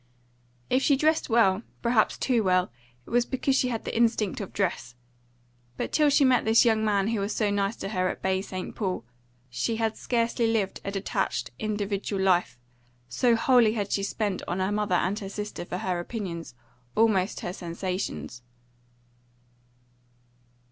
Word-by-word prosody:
If 255 - +2
she 280 - +4
dressed 310 +2 +1
well, 220 -4 +4 0.2
perhaps 235 -2 +2
too 245 -4 +1
well, 185 -6 +2 0.3
it - - -13
was 240 0 +4
because 265 +2 0
she 260 - +2
had 230 -3 -3
the - - -4
instinct 225 -4 +1
of 195 - -6
dress; 170 -11 -2 0.8
but - - -3
till 300 -1 +4
she 280 0 +4
met 255 -1 +4
this 225 +3 +5
young 220 -2 +3
man 205 -1 +1
who 225 -2 0
was 200 +2 -2
so 210 -2 +1
nice 200 +2 0
to 195 - -5
her 185 -3 0
at - - -5
Baie 190 0 +1
St. 185 -2 -6
Paul, 185 - -2 0.4
she 125 - -2
had 220 -1 -1
scarcely 235 -1 0
lived 220 -4 -1
a - - -3
detached, 195 0 -2
individual 205 -2 -2
life, 180 -8 +2 0.5
so 235 - +3
wholly 230 -1 +4
had 205 -3 -3
she 200 - +1
depended 200 -1 -2
on 175 - -2
her 190 +2 0
mother 210 -3 0
and 190 +4 0
her 195 -3 -6
sister 210 -2 -5
for 180 - -4
her 180 -1 -2
opinions, 175 - -5 0.4
almost 215 -4 +2
her 175 - -4
sensations. 175 - -4
205 Hz, 170 wpm, -27 LUFS, 185-230 Hz, 0.8 s, this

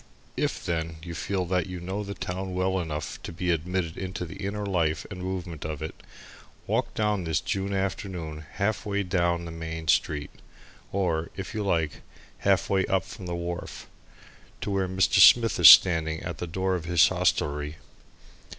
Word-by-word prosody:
If, - - -2
then, 80 -1 -2
you 85 -1 -6
feel 95 +2 -2
that 90 +1 0
you 90 -1 -6
know 95 +4 -4
the 100 0 -6
town 95 +1 -4
well 95 +1 +1
enough 75 -3 -5
to - - -7
be 90 +2 -1
admitted 85 0 -2
into 95 -1 -4
the 90 +3 -9
inner 100 +1 -3
life 80 -5 0
and 90 -2 -6
movement 90 -4 -5
of 80 -1 -4
it, 80 - -5 0.7
walk - - -1
down 105 -3 0
this 80 -2 0
June 100 0 -2
afternoon 95 -5 -3
half 100 +1 -1
way 100 -1 -1
down 85 -2 0
the 85 - -6
Main 80 0 -6
Street 75 -1 +1 0.6
or, 85 -4 0
if 95 +1 -6
you 110 -1 -2
like, 80 -6 0 0.4
half - - +2
way 95 -1 +2
up 95 -1 +1
from 90 -1 -9
the 85 - -3
wharf 85 0 -5 0.8
to - - -2
where 95 -1 0
Mr. 95 0 +2
Smith 115 -4 +7
is 85 -5 +11
standing 80 -2 +6
at - - -5
the 90 - -3
door 95 +3 -1
of 90 -3 -3
his 85 -1 +5
hostelry. 75 +1 0
90 Hz, 180 wpm, -27 LUFS, 80-95 Hz, 0.8 s, is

